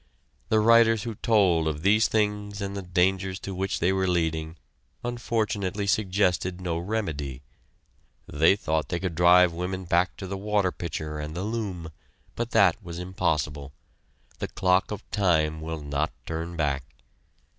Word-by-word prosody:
The 110 - +4
writers 115 -1 +5
who 115 - -4
told 95 -7 +2
of 75 0 -3
these 105 +3 +4
things 105 -1 -1
and 100 -1 -4
the 100 - -3
dangers 95 +1 0
to 95 - -5
which 95 +1 -2
they 90 +3 +2
were 95 0 0
leading 80 -2 -1 0.5
unfortunately 110 -5 -2
suggested 95 -3 +1
no 85 -2 -2
remedy. 80 - -3 0.8
They 80 +6 +4
thought 80 -5 -1
they 85 - -1
could 95 -2 -3
drive 90 +1 +5
women 90 +2 -4
back 85 +2 +1
to 95 - -6
the 95 +1 -4
water 100 -2 +1
pitcher 75 -3 -5
and 75 +1 -6
the 90 - -3
loom, 100 -7 -4 0.4
but 120 0 -3
that 95 -7 +4
was 85 -1 -7
impossible. 75 -6 -2 0.7
The - - -2
clock 90 0 +1
of 105 - -7
time 80 -6 +1
will 80 -1 -5
not 70 +2 -1
turn 80 +1 -4
back. 70 -4 -1
90 Hz, 155 wpm, -26 LUFS, 80-100 Hz, 0.8 s, writers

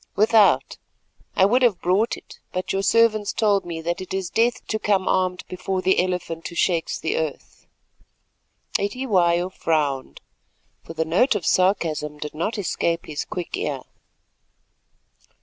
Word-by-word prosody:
"Without. 205 - +4 0.6
I 190 - +5
would 245 +6 +3
have 235 -8 +3
brought 190 +6 +1
it, - - -15
but 185 0 -3
your 195 - 0
servants 215 0 +3
told 205 -4 +2
me 165 -1 -5
that 170 +2 -2
it 185 0 -5
is 190 -3 -3
death 235 +2 +1
to 220 - -2
come 195 -3 +1
armed 185 -1 +1
before 185 +1 -3
the 190 - +4
'Elephant 180 -3 -3
who 170 - -10
shakes 170 -2 0
the 160 - -2
Earth.'" 155 -3 -5 1.1
Cetywayo 190 -6 +1
frowned, 145 -7 -1 0.6
for 165 - -10
the 160 0 0
note 210 - +3
of 195 - -2
sarcasm 160 -5 +1
did 150 0 -6
not 170 +8 -2
escape 170 -3 -1
his 150 -2 -4
quick 180 -2 -5
ear. 140 -3 -3
185 Hz, 150 wpm, -23 LUFS, 165-205 Hz, 1.1 s, I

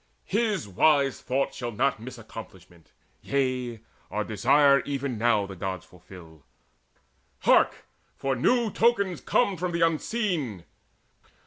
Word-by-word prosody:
His 210 - 0
wise 140 +7 +2
thought 135 +1 -1
shall 120 -2 -5
not 130 +3 0
miss 125 +2 -9
accomplishment. 95 -7 -12 0.3
Yea, 130 -4 -1 0.3
our 105 - -2
desire 140 +6 +4
even 140 -3 -3
now 110 -3 +2
the 100 0 -9
Gods 95 -1 -5
fulfil. 85 -4 -15 1.0
Hark! - - +3 0.3
for 135 -1 -1
new 235 - +2
tokens 200 -6 +1
come 200 -6 +1
from 175 +1 -3
the 170 - -1
Unseen! 165 - -1
130 Hz, 120 wpm, -26 LUFS, 105-165 Hz, 1.0 s, desire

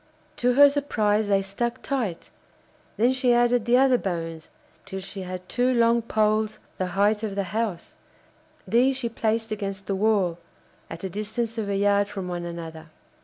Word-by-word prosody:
To 245 0 +2
her 285 +3 +8
surprise 220 -7 +1
they 195 -1 +2
stuck 235 +6 -3
tight; 235 -11 -3 0.7
then 240 +4 +3
she 255 -2 +3
added 240 -1 +3
the 240 +1 +4
other 260 -2 +4
bones, 165 -3 -4 0.3
till 190 - -6
she 195 +1 -8
had 180 0 -7
two 250 +1 +1
long 235 -1 +3
poles 215 -1 +1 0.2
the 185 - 0
height 210 +1 +3
of 210 -3 -3
the 200 - 0
house; 220 -6 -3 0.7
these 255 +3 +3
she 240 -3 -2
placed 225 0 -1
against 200 -2 -4
the 195 - -2
wall, 195 -4 +1 0.5
at 165 +2 -8
a 190 - -2
distance 220 +3 -3
of 205 -2 -3
a 200 - 0
yard 200 0 +3
from 195 -3 -6
one 175 -1 -4
another. 165 -2 -7
215 Hz, 170 wpm, -25 LUFS, 195-235 Hz, 0.7 s, her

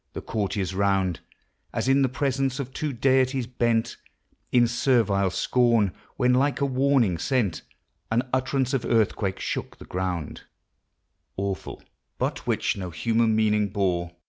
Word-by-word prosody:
The - - -5
courtiers 100 -3 -2
round, 95 -2 +1 0.5
As - - -1
in 135 +1 +4
the 135 - +3
presence 135 0 -1
of 130 -1 -5
two 150 +1 -2
deities, 130 0 +2
bent 115 -2 0 0.5
In 120 -1 +5
servile 115 -6 +2
scorn: 115 -1 +2 0.3
when, 125 -1 +3
like 135 +3 +2
a 140 - +2
warning 130 - +2
sent, 110 - 0 0.5
An 120 +3 0
utterance 130 0 0
of 130 -4 0
earthquake 110 -4 +1
shook - - -4
the - - -12
ground, 90 -4 -3 1.0
Awful, 100 0 -4 0.3
but - - -3
which - - +1
no 95 -2 -5
human 110 +7 +1
meaning 105 -1 +2
bore. 90 -4 -1
115 Hz, 140 wpm, -25 LUFS, 100-130 Hz, 1.0 s, In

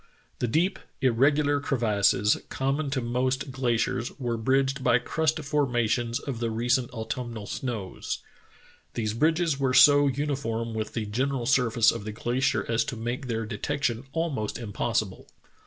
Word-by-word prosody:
The 125 - 0
deep, 165 - +1 0.2
irregular 145 +4 +3
crevasses 105 -6 +2
common 140 +2 -1
to 135 -1 -1
most 130 +3 -1
gla 130 -2 0
ciers 115 +1 -1
were 120 -3 -1
bridged 135 +4 +1
by 120 - +5
crust 160 +5 0
formations 120 -4 0
of 135 -5 -5
the 115 -1 -1
recent 120 +2 +1
autumnal 115 -2 -5
snows. 110 -5 -4 0.8
These 110 -2 -1
bridges 160 +3 +1
were 130 -2 +1
so 145 +2 +7
uniform 130 -5 -2
with 110 -1 -4
the 110 - -2
general 125 +4 -1
surface 115 -2 +4
of 115 -3 -6
the 110 - -5
glacier 120 -2 0
as 115 0 +2
to - - -4
make 120 +4 -4
their 115 -1 -2
de 105 -2 -6
tection 135 -3 -1
almost 145 -10 -2
impossible. 110 -2 -2
125 Hz, 150 wpm, -27 LUFS, 115-140 Hz, 0.8 s, so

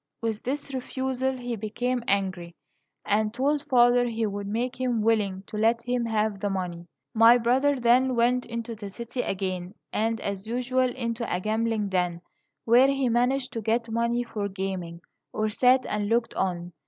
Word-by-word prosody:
With 225 -2 -2
this 280 +2 -4
refusal 260 0 -2
he 245 -1 -4
became 235 +4 -2
angry, 185 -3 -1 0.5
and 210 +1 +1
told 280 +5 0
father 245 -2 +4
he 225 -1 -1
would 200 -1 -4
make 245 +4 -2
him 240 -4 0
willing 205 -4 +1
to 210 - -7
let 230 +2 +2
him 245 -1 -1
have 215 -2 0
the 205 +1 -1
money. 175 -3 -4 0.3
My 230 +2 +7
brother 260 +5 +2
then 250 +1 +3
went 245 +2 +2
into 235 0 -5
the 205 -2 -7
city 235 +4 -5
again, 185 -1 -3 0.2
and, 225 +1 0
as 200 0 -4
usual, 250 +2 +1
into 235 -2 -3
a 180 - 0
gambling 220 0 -1
den, 180 -2 -1 0.4
where 245 +3 +6
he 275 -2 +1
managed 250 +3 +1
to 225 - -3
get 230 +1 0
money 235 +1 0
for 210 -4 -4
gaming, 190 -3 -5 0.3
or 215 0 0
sat 250 +4 +4
and 210 -1 -2
looked 230 0 +1
on. 175 -2 -2
230 Hz, 170 wpm, -26 LUFS, 205-245 Hz, 0.5 s, My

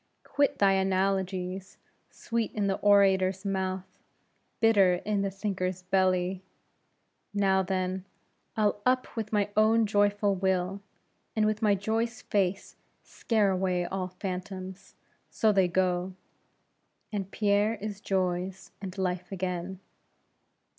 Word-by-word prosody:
Quit 285 0 +1
thy 200 -1 +4
analogies; 190 -1 -1 0.3
sweet 230 -1 -3
in 210 -2 0
the 195 -1 0
orator's 195 -1 +4
mouth, 190 -1 -3 0.6
bitter 200 -5 +5
in 200 +3 -1
the 195 - 0
thinker's 190 -2 -3
belly. 185 0 +1 0.9
Now, 195 -1 +3
then, 185 0 -2 0.5
I'll 210 -1 +1
up 255 +1 +1
with 220 -2 -4
my 205 -1 +1
own 220 +1 +4
joyful 205 0 +2
will; 190 0 0 0.5
and 215 -1 +2
with 215 +1 0
my 210 -2 +4
joy's 220 +3 -2
face 195 -1 -1 0.3
scare 215 -4 +1
away 185 -1 0
all 185 +1 -3
phantoms: 185 0 -7 0.3
so, 220 - +2
they 190 -3 +3
go; 180 0 0 1.0
and 195 -3 -3
Pierre 205 +1 +2
is 205 -2 -6
Joy's, 185 -1 -2
and 190 -1 -7
Life's 185 -1 -2
again. 185 0 -4
195 Hz, 120 wpm, -28 LUFS, 185-205 Hz, 1.0 s, bitter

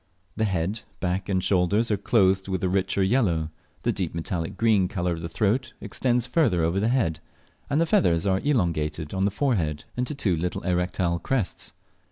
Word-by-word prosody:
The 110 - +1
head, 95 +2 -1 0.2
back, 95 +2 -2
and 95 -2 +1
shoulders 100 +5 +2
are - - +4
clothed 95 -2 +2
with 95 -2 -2
a - - +3
richer 95 +1 +1
yellow, 95 -8 +1 0.3
the - - +2
deep - - -3
metallic 85 0 -3
green 110 -5 +3
colour 90 -2 -1
of 80 - -6
the 85 - -5
throat 110 +9 0
extends 120 +3 0
further 125 - +2
over 85 +4 +1
the 105 - +1
head, 115 -11 +1 0.5
and 145 +2 +2
the 165 - +3
feathers 105 - +2
are 95 -1 +2
elongated 85 - -1
on 95 0 +1
the - - +3
forehead 95 - 0
into 125 +4 -2
two 100 -10 +1
little 90 +2 -3
erectile 90 -1 0
crests. 125 -4 -2
95 Hz, 185 wpm, -25 LUFS, 85-115 Hz, 0.5 s, are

